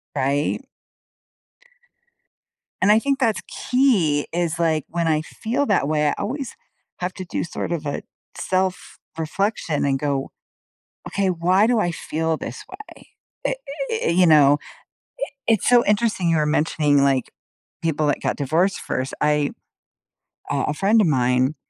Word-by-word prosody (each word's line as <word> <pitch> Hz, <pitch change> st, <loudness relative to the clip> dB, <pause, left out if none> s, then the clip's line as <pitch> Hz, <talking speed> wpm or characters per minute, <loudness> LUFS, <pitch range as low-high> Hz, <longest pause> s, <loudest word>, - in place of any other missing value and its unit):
Right? 140 Hz, -, 0 dB, 2.2 s
And 195 Hz, +3 st, +5 dB
I 215 Hz, -, +6 dB
think 275 Hz, +3 st, 0 dB
that's 230 Hz, -5 st, +1 dB
key 205 Hz, -, +1 dB
is, 170 Hz, -1 st, -1 dB
like, 160 Hz, -3 st, +1 dB
when 170 Hz, 0 st, -1 dB
I 155 Hz, -1 st, +2 dB
feel 235 Hz, -, -2 dB
that 195 Hz, -9 st, +2 dB
way, 150 Hz, 0 st, +1 dB
I -, -, 0 dB
always 255 Hz, +6 st, -4 dB, 0.4 s
have 180 Hz, 0 st, -3 dB
to 185 Hz, -, -6 dB
do -, -, -3 dB
sort 170 Hz, -, -5 dB
of 165 Hz, -3 st, -3 dB
a 145 Hz, -, -3 dB, 0.4 s
self-reflection 185 Hz, -2 st, -2 dB
and 135 Hz, -1 st, +1 dB
go, 140 Hz, -2 st, -2 dB, 0.8 s
"Okay. 195 Hz, -1 st, 0 dB
Why 185 Hz, +4 st, +3 dB
do 240 Hz, 0 st, +2 dB
I 175 Hz, -5 st, +1 dB
feel 160 Hz, -1 st, -2 dB
this 120 Hz, -4 st, -7 dB
way," 405 Hz, +3 st, -13 dB, 0.4 s
i -, -, 0 dB, 0.4 s
i 450 Hz, -, -1 dB
you 180 Hz, +1 st, +4 dB
know? 145 Hz, -3 st, +6 dB, 0.7 s
I -, -, -13 dB, 0.2 s
it's 225 Hz, -4 st, +2 dB
so 245 Hz, -1 st, +5 dB
interesting 210 Hz, -3 st, +1 dB
you 165 Hz, -, +3 dB
were 150 Hz, -, +2 dB
mentioning, 150 Hz, -1 st, +2 dB
like, 135 Hz, -2 st, +1 dB, 0.5 s
people 155 Hz, -2 st, 0 dB
that 145 Hz, -, 0 dB
got -, -, -1 dB
divorced 165 Hz, +8 st, +1 dB
first. 130 Hz, +1 st, -3 dB
I 150 Hz, -1 st, +2 dB, 1.0 s
uh, 140 Hz, -1 st, 0 dB
a 150 Hz, -, 0 dB
friend 205 Hz, +8 st, +3 dB
of 195 Hz, -, +3 dB
mine, 130 Hz, 0 st, +2 dB
165 Hz, 150 wpm, -22 LUFS, 150-205 Hz, 2.2 s, I